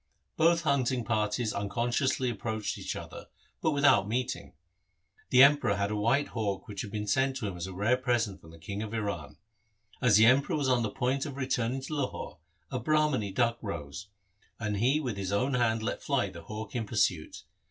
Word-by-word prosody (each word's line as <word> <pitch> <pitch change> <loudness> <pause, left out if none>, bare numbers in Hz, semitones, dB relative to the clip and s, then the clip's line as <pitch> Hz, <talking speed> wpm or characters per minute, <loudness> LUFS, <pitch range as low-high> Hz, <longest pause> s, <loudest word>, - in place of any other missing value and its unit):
Both 170 +1 +4
hunting 130 -4 +1
parties 110 0 0
unconsc 115 +5 -1
ously 130 -2 +1
approached 110 -1 -3
each - - -4
other, - - -8 0.3
but - - +2
without 140 -9 +4
meeting. 125 - -3 0.7
The 130 +1 +8
Emperor 140 -7 +5
had 100 +1 -1
a - - -1
white 120 +7 +1
hawk 105 -4 -3
which 100 -2 -5
had 105 - -6
been 105 0 -4
sent 130 +5 +1
him 100 -3 -3
as 90 +1 -5
a 95 - -7
rare 110 +7 +2
present 120 -5 -1
from 80 - -15
the 80 - -13
King 100 +5 -5
of 110 +1 -5
Iran. 100 -9 -4 0.6
As 120 -5 +5
the 110 - +7
Emperor 130 +6 +4
was 145 -3 0
on 125 -2 +3
the 110 - -1
point 130 +7 -1
of 140 -2 -7
returning 130 -1 -1
to 155 - -6
Lahore, 140 - -4 0.3
a 130 - -2
Brahmani 150 -5 +1
duck 115 +3 +1
rose, 95 -2 -6 0.5
and 105 -2 -2
he 130 +8 +3
with 125 -9 -3
his 95 -1 -3
own 125 +7 +1
hand 115 -3 +1
let 115 - -3
fly 130 -9 0
the 85 -2 -10
hawk 110 -1 -7
in 115 -3 -2
pursuit. 95 -7 0
115 Hz, 195 wpm, -29 LUFS, 100-130 Hz, 0.7 s, The